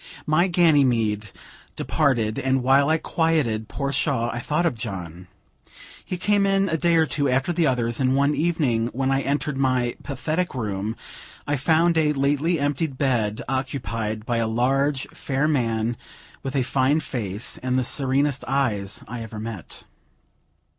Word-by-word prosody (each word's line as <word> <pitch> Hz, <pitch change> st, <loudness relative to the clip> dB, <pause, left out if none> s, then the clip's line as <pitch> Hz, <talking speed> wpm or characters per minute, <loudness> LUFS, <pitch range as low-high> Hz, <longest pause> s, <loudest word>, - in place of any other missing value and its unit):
My 155 Hz, +4 st, +3 dB
Ganymede 125 Hz, -, +2 dB, 0.5 s
departed, 120 Hz, -8 st, 0 dB
and 130 Hz, -1 st, +1 dB
while 135 Hz, +3 st, +4 dB
I 160 Hz, -, +3 dB
quieted 155 Hz, -11 st, 0 dB
poor 140 Hz, -1 st, -3 dB
Shaw, 125 Hz, -5 st, +1 dB
I 120 Hz, -, -4 dB
thought 150 Hz, +7 st, 0 dB
of 165 Hz, -, +1 dB
John. 90 Hz, -6 st, -6 dB, 0.8 s
He 180 Hz, -, -4 dB
came 200 Hz, +2 st, +2 dB
in 195 Hz, 0 st, +2 dB
a 165 Hz, -, 0 dB
day 170 Hz, +1 st, +2 dB
or 160 Hz, -1 st, +4 dB
two 145 Hz, -2 st, 0 dB
after 135 Hz, +7 st, +1 dB
the 165 Hz, -2 st, +2 dB
others; 120 Hz, -3 st, 0 dB
and, 130 Hz, 0 st, +2 dB
one 140 Hz, +2 st, +3 dB
evening, 145 Hz, -9 st, +1 dB
when 135 Hz, +1 st, 0 dB
I 135 Hz, 0 st, +2 dB
entered 140 Hz, 0 st, -1 dB
my 130 Hz, -3 st, +1 dB
"pathetic 155 Hz, +4 st, -2 dB
room," 105 Hz, -2 st, -3 dB, 0.5 s
I 145 Hz, -, 0 dB
found 160 Hz, +4 st, +3 dB
a 150 Hz, -1 st, +2 dB
lately 145 Hz, +4 st, +1 dB
emptied 145 Hz, 0 st, -1 dB
bed 115 Hz, -6 st, 0 dB
occupied 115 Hz, -5 st, -3 dB
by 120 Hz, -1 st, 0 dB
a 115 Hz, -1 st, +1 dB
large, 135 Hz, +4 st, +1 dB
fair 135 Hz, +2 st, -1 dB
man, 115 Hz, -5 st, 0 dB, 0.4 s
with 135 Hz, +1 st, -5 dB
a 135 Hz, -, +2 dB
fine 135 Hz, +4 st, +2 dB
face, 110 Hz, -8 st, -3 dB
and 130 Hz, 0 st, 0 dB
the 130 Hz, -, +2 dB
serenest 135 Hz, +2 st, +1 dB
eyes 110 Hz, -7 st, -1 dB
I 120 Hz, 0 st, -6 dB
ever 110 Hz, -1 st, -7 dB
met. 110 Hz, -5 st, -7 dB
135 Hz, 160 wpm, -23 LUFS, 115-150 Hz, 0.8 s, while